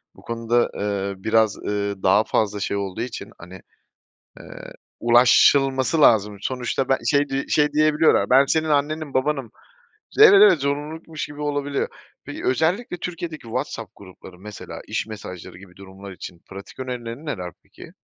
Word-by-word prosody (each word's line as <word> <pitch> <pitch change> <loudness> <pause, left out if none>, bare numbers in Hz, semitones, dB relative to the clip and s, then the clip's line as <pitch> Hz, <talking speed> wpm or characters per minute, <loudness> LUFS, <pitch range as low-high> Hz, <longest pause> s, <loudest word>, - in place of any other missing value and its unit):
bu - - -17
konuda, 115 +1 0
eee, 100 -1 -3
biraz, 110 -1 +2
ııı, 100 -1 -4
daha 95 +3 +4
fazla 105 -2 -1
şey 100 0 -2
olduğu 100 0 -4
için 120 0 -6
hani, 90 +2 -12 0.8
eee, - - -11 0.6
ulaşılması 130 +4 +4
lazım. 105 -6 +4
Sonuçta 130 +3 -3
ben 135 - +2
şey 145 0 +2
di 135 +1 -2
şey 150 -1 +2
diyebiliyorlar 155 -1 +3
"Ben 135 +2 +6
senin 160 +2 0
annenim, 150 0 -1
babanım!" 135 -3 -1 0.7
Evet, - - +9
evet. 200 -4 +7
Zorunlulukmuş 150 +3 -4
gibi 145 0 -10
olabiliyor. 145 -1 -2 0.4
Peki, - - -8
özellikle 175 - 0
Türkiye'deki 170 -2 -6
WhatsApp 115 -1 -5
grupları, 95 -2 -14
mesela 105 +1 -9
iş - - -3
mesajları 95 -6 -9
gibi 90 -1 -16
durumlar 95 0 -12
için 90 -1 -10
pratik 100 +6 -11
önerilerin 125 +2 -6
neler 90 - -5
peki? - - -14
125 Hz, 145 wpm, -22 LUFS, 100-150 Hz, 0.8 s, Evet